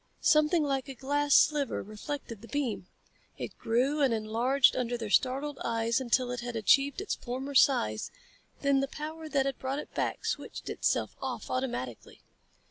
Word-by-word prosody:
Something 305 Hz, +1 st, +4 dB
like 275 Hz, -1 st, -1 dB
a 270 Hz, -, -6 dB
glass 290 Hz, +2 st, +1 dB
sliver 295 Hz, -2 st, +3 dB
reflected 225 Hz, +1 st, -6 dB
the 230 Hz, -, -11 dB
beam. 250 Hz, -10 st, -2 dB, 0.5 s
It -, -, -6 dB
grew 260 Hz, +6 st, +1 dB
and 270 Hz, -3 st, +4 dB
enlarged 235 Hz, +5 st, +3 dB
under 245 Hz, -1 st, -1 dB
their 220 Hz, -3 st, -5 dB
startled 275 Hz, +4 st, +1 dB
eyes 230 Hz, +1 st, 0 dB
until 250 Hz, 0 st, +1 dB
it 245 Hz, -, -3 dB
had 240 Hz, 0 st, -5 dB
achieved 275 Hz, -, +3 dB
its 405 Hz, -, -2 dB
former 265 Hz, +3 st, -5 dB
size, 255 Hz, -, +3 dB, 0.5 s
then 280 Hz, -1 st, +3 dB
the 275 Hz, -, 0 dB
power 315 Hz, +2 st, -7 dB
that 275 Hz, -3 st, +1 dB
had 275 Hz, -1 st, -2 dB
brought 265 Hz, +1 st, -2 dB
it 295 Hz, -, -7 dB
back -, -, -2 dB
switched -, -, -4 dB
itself -, -, 0 dB
off -, -, -4 dB
automatically. 240 Hz, -, -4 dB
265 Hz, 165 wpm, -30 LUFS, 235-285 Hz, 0.5 s, Something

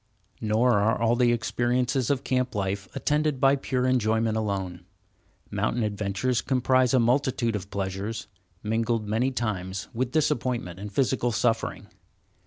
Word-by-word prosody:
Nor 110 Hz, +1 st, +3 dB
are 110 Hz, +4 st, +2 dB
all 115 Hz, +1 st, +3 dB
the 120 Hz, -1 st, +3 dB
experiences 120 Hz, +2 st, 0 dB
of 140 Hz, -3 st, 0 dB
camp 125 Hz, -2 st, 0 dB
life 100 Hz, 0 st, -2 dB
attended 150 Hz, -2 st, 0 dB
by 135 Hz, +2 st, +5 dB
pure 130 Hz, -2 st, -1 dB
enjoyment 115 Hz, -3 st, +2 dB
alone. 95 Hz, -5 st, -3 dB, 0.7 s
Mountain 120 Hz, -, 0 dB
adventures 105 Hz, +4 st, -1 dB
comprise 130 Hz, -1 st, +2 dB
a -, -, +5 dB
multitude 120 Hz, -1 st, +1 dB
of 100 Hz, -1 st, -5 dB
pleasures, 100 Hz, +1 st, -3 dB, 0.4 s
mingled 115 Hz, 0 st, 0 dB
many 115 Hz, +5 st, +1 dB
times 100 Hz, -7 st, -3 dB
with 125 Hz, +1 st, -1 dB
disappointment 120 Hz, -, 0 dB
and 105 Hz, +1 st, -6 dB
physical 125 Hz, +1 st, +1 dB
suffering. 115 Hz, 0 st, 0 dB
115 Hz, 135 wpm, -26 LUFS, 105-125 Hz, 0.7 s, by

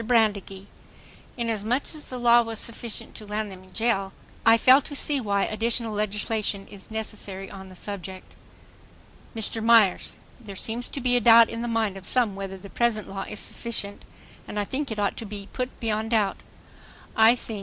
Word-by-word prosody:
BRANDEGEE: 210 Hz, -4 st, +1 dB, 0.7 s
Inasmuch 230 Hz, +2 st, 0 dB
as 305 Hz, -1 st, -6 dB
the 255 Hz, -, -6 dB
law 240 Hz, 0 st, +6 dB
was 225 Hz, -1 st, -5 dB
sufficient 230 Hz, 0 st, -4 dB
to 215 Hz, -, -6 dB
land 210 Hz, 0 st, -3 dB
them 185 Hz, -1 st, -11 dB
in 185 Hz, -, -19 dB
jail... 195 Hz, -4 st, 0 dB, 0.3 s
I 225 Hz, 0 st, +7 dB
fail 260 Hz, +4 st, +7 dB
to 285 Hz, -, -6 dB
see 285 Hz, 0 st, +2 dB
why 200 Hz, -3 st, +1 dB
additional 225 Hz, +1 st, -1 dB
legislation 210 Hz, -1 st, -2 dB
is 195 Hz, -2 st, -11 dB
necessary 205 Hz, -3 st, -5 dB
on 190 Hz, -1 st, -9 dB
the 185 Hz, -, -13 dB
subject. 190 Hz, -1 st, -7 dB, 1.0 s
MR. 225 Hz, 0 st, 0 dB
MYERS: 225 Hz, -5 st, +5 dB, 0.3 s
There 210 Hz, -5 st, -10 dB
seems 230 Hz, +5 st, -3 dB
to 275 Hz, -, -5 dB
be 245 Hz, 0 st, +2 dB
a -, -, +1 dB
doubt 230 Hz, 0 st, +8 dB
in 230 Hz, 0 st, -4 dB
the 240 Hz, -, -2 dB
mind 220 Hz, -4 st, 0 dB
of 190 Hz, -, -10 dB
some 235 Hz, -6 st, +2 dB
whether 195 Hz, -1 st, -6 dB
the 190 Hz, -, -11 dB
present 220 Hz, 0 st, 0 dB
law 195 Hz, 0 st, -5 dB
is 210 Hz, -, -2 dB
sufficient 215 Hz, -4 st, -3 dB, 0.4 s
and -, -, -6 dB
I 205 Hz, -, +1 dB
think 275 Hz, +6 st, -3 dB
it 220 Hz, -, -4 dB
ought 205 Hz, -1 st, 0 dB
to 230 Hz, -, -5 dB
be 200 Hz, -1 st, -8 dB
put 255 Hz, 0 st, -4 dB
beyond 220 Hz, -1 st, -1 dB
doubt. 215 Hz, -4 st, +2 dB, 0.8 s
I 225 Hz, +2 st, +7 dB
think 225 Hz, -3 st, -7 dB
220 Hz, 185 wpm, -26 LUFS, 200-235 Hz, 1.0 s, doubt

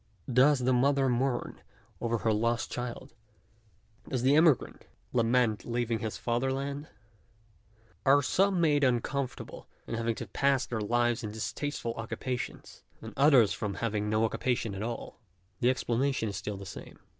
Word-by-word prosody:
does 135 Hz, +4 st, +5 dB
the 130 Hz, 0 st, +1 dB
mother 135 Hz, +2 st, +3 dB
mourn 125 Hz, 0 st, -1 dB, 0.4 s
over 115 Hz, 0 st, 0 dB
her 110 Hz, 0 st, +1 dB
lost 115 Hz, +2 st, 0 dB
child? 125 Hz, -1 st, -5 dB, 1.0 s
does 130 Hz, -3 st, -1 dB
the 135 Hz, +3 st, +5 dB
emigrant 155 Hz, -4 st, +3 dB, 0.3 s
lament 115 Hz, -3 st, +2 dB
leaving 120 Hz, -1 st, -1 dB
his 110 Hz, -1 st, -4 dB
father 120 Hz, +3 st, 0 dB
land? 140 Hz, +2 st, -4 dB, 1.2 s
are 140 Hz, +1 st, +5 dB
some 195 Hz, +6 st, +2 dB
made 150 Hz, -3 st, +3 dB
uncomfortable 130 Hz, +1 st, -2 dB, 0.2 s
by -, -, -4 dB
having 115 Hz, 0 st, -1 dB
to -, -, -6 dB
pass 135 Hz, -3 st, +1 dB
their 110 Hz, -2 st, -3 dB
lives 120 Hz, +2 st, +1 dB
in 105 Hz, -, -3 dB
distasteful 115 Hz, +2 st, -3 dB
occupations, 125 Hz, +2 st, -5 dB, 0.2 s
and -, -, -9 dB
others 135 Hz, -6 st, +5 dB
from 100 Hz, -2 st, -3 dB
having 105 Hz, -2 st, -2 dB
no 110 Hz, +1 st, +2 dB
oc 110 Hz, -, -2 dB
cupation 115 Hz, -5 st, -1 dB
at 95 Hz, -, -5 dB
all? 115 Hz, 0 st, -5 dB, 0.4 s
the 120 Hz, -, +3 dB
explanation 130 Hz, -1 st, 0 dB
is 100 Hz, -, -5 dB
still 105 Hz, -1 st, -4 dB
the 100 Hz, -, -8 dB
same. 95 Hz, -, -10 dB
120 Hz, 155 wpm, -30 LUFS, 115-135 Hz, 1.2 s, does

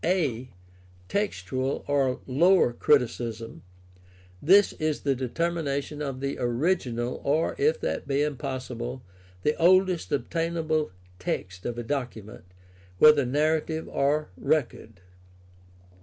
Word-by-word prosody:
a) 145 Hz, -9 st, 0 dB, 0.6 s
Textual 130 Hz, -, -2 dB
or 135 Hz, -3 st, +1 dB
lower 165 Hz, 0 st, +4 dB
criticism. 120 Hz, -4 st, 0 dB, 0.4 s
— 90 Hz, 0 st, -27 dB
This 200 Hz, +1 st, +7 dB
is 155 Hz, -1 st, -1 dB
the 140 Hz, -, +1 dB
determination 145 Hz, +2 st, -2 dB
of 135 Hz, -3 st, -4 dB
the 140 Hz, 0 st, -3 dB
original, 120 Hz, -2 st, -1 dB
or, 150 Hz, +4 st, +1 dB
if 460 Hz, +3 st, +2 dB
that -, -, -3 dB
be 140 Hz, +1 st, +1 dB
impossible, 130 Hz, -3 st, -4 dB, 0.4 s
the 150 Hz, -, +2 dB
oldest 185 Hz, 0 st, +3 dB
obtainable 160 Hz, +1 st, -1 dB, 0.3 s
text 90 Hz, 0 st, -4 dB
of 120 Hz, -1 st, -4 dB
a 120 Hz, -, -3 dB
document, 115 Hz, -7 st, -5 dB, 0.5 s
whether 145 Hz, +1 st, +6 dB
narrative 155 Hz, +3 st, 0 dB
or 150 Hz, +2 st, 0 dB
record. 120 Hz, -, -2 dB
140 Hz, 110 wpm, -26 LUFS, 120-160 Hz, 0.6 s, This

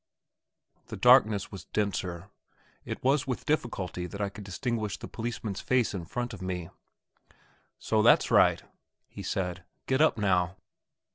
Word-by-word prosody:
The -, -, -7 dB
darkness 110 Hz, -5 st, +5 dB
was 95 Hz, -, -9 dB
denser; 95 Hz, -3 st, -3 dB, 0.5 s
it -, -, -6 dB
was 140 Hz, +2 st, +2 dB
with 125 Hz, -, -3 dB
difficulty 95 Hz, -, -2 dB
that 100 Hz, -, -8 dB
I 100 Hz, -1 st, 0 dB
could 105 Hz, +1 st, -10 dB
distinguish 105 Hz, +2 st, -3 dB
the -, -, -8 dB
policeman's 115 Hz, -4 st, -4 dB
face 125 Hz, -4 st, +1 dB
in 90 Hz, -4 st, -4 dB
front 120 Hz, +6 st, -4 dB
of 100 Hz, -, -9 dB
me. 90 Hz, -2 st, -4 dB, 1.1 s
"So, -, -, +1 dB
that's -, -, +5 dB
right," -, -, +5 dB, 0.5 s
he 100 Hz, -, -9 dB
said; 95 Hz, -2 st, -3 dB, 0.2 s
"get 130 Hz, +2 st, +1 dB
up 160 Hz, -, +4 dB
now." 90 Hz, -3 st, +1 dB
100 Hz, 145 wpm, -29 LUFS, 95-120 Hz, 1.1 s, darkness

